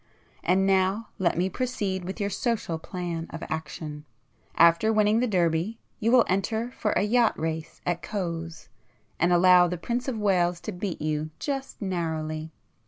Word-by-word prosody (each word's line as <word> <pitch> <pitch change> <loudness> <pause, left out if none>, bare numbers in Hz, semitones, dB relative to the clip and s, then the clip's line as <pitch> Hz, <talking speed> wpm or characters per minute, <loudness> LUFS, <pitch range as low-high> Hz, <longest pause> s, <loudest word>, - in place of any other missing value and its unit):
And 190 +2 +3
now 195 +3 +2
let 175 -3 +1
me 180 +2 +2
proceed 195 -5 -2
with 190 +4 -5
your 200 0 -1
social 205 -7 -1
plan 170 -1 -4
of 165 - -7
action. 150 -1 -5 0.5
After 170 +6 +5
winning 215 0 +3
the 250 - +1
Derby 175 +1 +1 0.2
you 225 +2 +1
will 250 -2 +6
enter 220 +5 -1
for 215 -4 -1
a - - +2
yacht 230 +2 +3
race 160 0 -4
at 175 -1 -1
Cowes, 170 -5 -4 0.5
and 175 +1 +3
allow 180 0 +6
the 175 +1 -3
Prince 240 +9 -3
of 255 -4 -2
Wales 180 -4 +2
to 215 - -4
beat 180 -3 -4
you 155 0 -1
just 275 -2 -4
narrowly. 160 -4 -3
185 Hz, 165 wpm, -26 LUFS, 165-215 Hz, 0.5 s, will